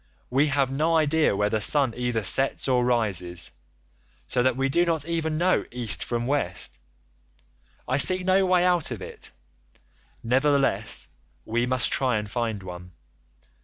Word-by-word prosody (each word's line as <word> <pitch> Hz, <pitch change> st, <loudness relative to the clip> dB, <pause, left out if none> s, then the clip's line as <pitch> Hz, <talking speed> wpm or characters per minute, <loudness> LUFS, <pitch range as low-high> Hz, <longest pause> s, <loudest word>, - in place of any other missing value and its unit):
We 140 Hz, +4 st, +3 dB
have 140 Hz, -2 st, 0 dB
no 155 Hz, +4 st, +1 dB
idea 155 Hz, -5 st, +2 dB
where 105 Hz, +1 st, 0 dB
the 110 Hz, -, 0 dB
sun 135 Hz, +2 st, +3 dB
either 120 Hz, -3 st, -2 dB
sets 135 Hz, +9 st, +1 dB
or 125 Hz, -2 st, +2 dB
rises,85 95 Hz, -8 st, -1 dB, 0.7 s
so 125 Hz, -, 0 dB
that 130 Hz, 0 st, +1 dB
we 135 Hz, 0 st, +1 dB
do 170 Hz, +6 st, +2 dB
not 165 Hz, -4 st, -1 dB
even 160 Hz, -2 st, -2 dB
know 180 Hz, +3 st, +2 dB
East 120 Hz, -3 st, 0 dB
from 120 Hz, 0 st, -2 dB
West. 120 Hz, -, -2 dB, 1.1 s
I 130 Hz, -, 0 dB
see 185 Hz, +5 st, +4 dB
no 190 Hz, +1 st, +3 dB
way 180 Hz, -1 st, +3 dB
out 175 Hz, -3 st, +1 dB
of 120 Hz, -6 st, -6 dB
it; -, -, -8 dB, 0.9 s
nevertheless, 130 Hz, -3 st, +1 dB, 0.4 s
we 120 Hz, +2 st, -1 dB
must 130 Hz, -3 st, 0 dB
try 125 Hz, -4 st, +1 dB
and 105 Hz, 0 st, -4 dB
find 110 Hz, -2 st, -3 dB
one. 90 Hz, -1 st, -10 dB
130 Hz, 155 wpm, -25 LUFS, 110-150 Hz, 1.1 s, see